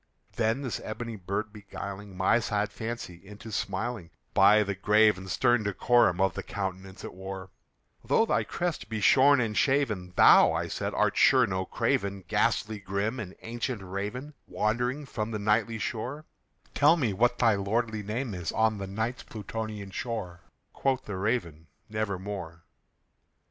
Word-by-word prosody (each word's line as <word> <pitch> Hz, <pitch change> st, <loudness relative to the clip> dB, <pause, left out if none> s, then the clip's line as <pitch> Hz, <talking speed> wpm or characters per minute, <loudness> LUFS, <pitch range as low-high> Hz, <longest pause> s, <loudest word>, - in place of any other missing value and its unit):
Then 115 Hz, +4 st, 0 dB
this 125 Hz, -, -3 dB
ebony 115 Hz, +1 st, -5 dB
bird 100 Hz, +3 st, -4 dB
beguiling 100 Hz, -1 st, -8 dB
my 95 Hz, +5 st, +3 dB
sad 105 Hz, -2 st, -1 dB
fancy 110 Hz, -7 st, -6 dB
into 105 Hz, +3 st, -11 dB
smiling, 100 Hz, 0 st, -3 dB, 0.2 s
By 105 Hz, +2 st, +6 dB
the 100 Hz, -1 st, -2 dB
grave 105 Hz, +2 st, +4 dB
and 95 Hz, 0 st, -9 dB
stern 120 Hz, +3 st, +3 dB
decorum 100 Hz, -1 st, +3 dB
of 95 Hz, -1 st, +2 dB
the -, -, -4 dB
countenance 95 Hz, -1 st, -5 dB
it -, -, -7 dB
wore, 95 Hz, 0 st, -7 dB, 0.5 s
"Though 225 Hz, -, +3 dB
thy -, -, +1 dB
crest 175 Hz, -10 st, -3 dB
be 110 Hz, -1 st, -3 dB
shorn 135 Hz, +6 st, +6 dB
and 110 Hz, -3 st, -1 dB
shaven, 110 Hz, -11 st, +1 dB
thou," -, -, +7 dB
I -, -, -2 dB
said, -, -, -3 dB
"art -, -, +1 dB
sure 130 Hz, -2 st, +6 dB
no 95 Hz, -3 st, -2 dB
craven, 100 Hz, 0 st, -1 dB
Ghastly 105 Hz, +5 st, +1 dB
grim 100 Hz, +5 st, -2 dB
and 95 Hz, -4 st, -7 dB
ancient 120 Hz, -1 st, -4 dB
Raven 105 Hz, +10 st, -5 dB
wandering 125 Hz, +7 st, -1 dB
from 115 Hz, -5 st, -4 dB
the 110 Hz, -, -3 dB
Nightly 110 Hz, +2 st, +1 dB
shore 125 Hz, +8 st, -4 dB, 0.5 s
Tell 150 Hz, +4 st, +5 dB
me 120 Hz, -10 st, 0 dB
what 120 Hz, +5 st, +2 dB
thy 115 Hz, -2 st, +4 dB
lordly 110 Hz, +2 st, -1 dB
name 110 Hz, +3 st, -3 dB
is 90 Hz, -4 st, -3 dB
on 110 Hz, -1 st, +1 dB
the 95 Hz, -, -4 dB
Night's 110 Hz, +5 st, -3 dB
Plutonian 110 Hz, -2 st, -6 dB
shore!" 100 Hz, -4 st, -4 dB, 0.3 s
Quoth 130 Hz, -1 st, 0 dB
the 100 Hz, -, -5 dB
Raven, 90 Hz, -7 st, -2 dB, 0.2 s
"Nevermore." 100 Hz, -5 st, -4 dB
105 Hz, 155 wpm, -28 LUFS, 95-120 Hz, 0.5 s, thou